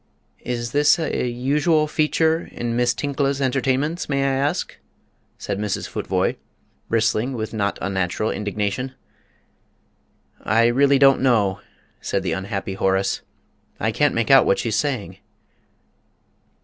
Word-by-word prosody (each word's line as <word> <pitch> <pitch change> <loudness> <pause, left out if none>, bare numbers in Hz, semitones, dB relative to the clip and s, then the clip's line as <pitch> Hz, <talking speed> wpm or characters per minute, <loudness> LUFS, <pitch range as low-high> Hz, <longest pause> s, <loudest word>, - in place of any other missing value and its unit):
"Is 120 -1 -4
this 145 +4 +4
a 155 -6 -1
usual 150 +6 +1
feature 160 +2 +1
in 120 -1 -3
Miss 120 0 +2
Tinkla's 140 +1 -1
entertainments, 135 +5 0
may 140 -1 +1
I 135 0 +1
ask?" 140 +2 -1 0.6
said 100 - -4
Mrs. 105 -1 -2
Futvoye, - - -1 0.5
bristling 115 +3 +1
with 110 -2 -4
not 100 -2 -1
unnatural 95 +2 -1
indignation. 105 +5 -3 1.5
"I 115 +3 +3
really 140 +4 +4
don't 135 0 +5
know," 105 -7 +2 0.4
said - - -2
the - - -1
unhappy 95 0 -4
Horace; 95 0 0 0.6
"I 110 - 0
can't 145 +5 +1
make 115 +2 +1
out 135 - +7
what - - +3
she's 115 -3 -1
saying." 110 - -2
120 Hz, 125 wpm, -22 LUFS, 105-140 Hz, 1.5 s, out